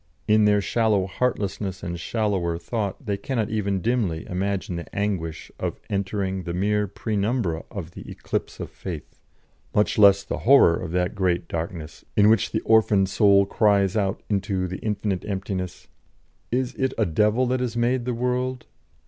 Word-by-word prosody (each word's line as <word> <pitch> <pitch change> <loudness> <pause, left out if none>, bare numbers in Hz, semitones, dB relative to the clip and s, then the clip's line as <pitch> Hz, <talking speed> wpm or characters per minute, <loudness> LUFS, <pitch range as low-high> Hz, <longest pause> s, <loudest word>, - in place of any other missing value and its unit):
In 105 0 +5
their 105 -1 +4
shallow 110 -3 +1
heartlessness 100 -3 -2
and 85 0 -4
shallower 95 -4 -1
thought 105 - -4
they 100 -2 -1
cannot 120 -4 -2
even 100 -3 -1
dimly 110 -10 0
imagine 95 0 -2
the 85 - -9
anguish 95 -6 -2
of - - -3
entering 95 -1 -1
the 85 -1 -4
mere 105 +2 +1
penumbra 100 -4 -1
of 85 -5 -7
the - - -10
Eclipse - - -4
of - - -6
Faith, 85 -6 -8 0.6
much 105 +1 +2
less 100 -1 +7
the - - -4
horror 125 -10 +6
of 85 - -5
that 90 +1 0
great 95 -4 0
darkness 80 -1 -5
in 105 +1 +6
which 110 -3 +3
the - - -1
orphaned 105 -4 +3
soul 100 -1 +5
cries 100 -2 +2
out 100 -2 -1
into 100 -2 -1
the 95 +1 -5
infinite 105 -3 -2
emptiness: 95 -2 -4 0.6
"Is 125 +1 0
it 130 -1 -1
a 110 - +2
Devil 105 +8 +2
that 125 +1 0
has 120 -2 -2
made 120 +1 +1
the 125 -1 -1
world? 125 +1 -1
100 Hz, 165 wpm, -24 LUFS, 95-110 Hz, 0.6 s, less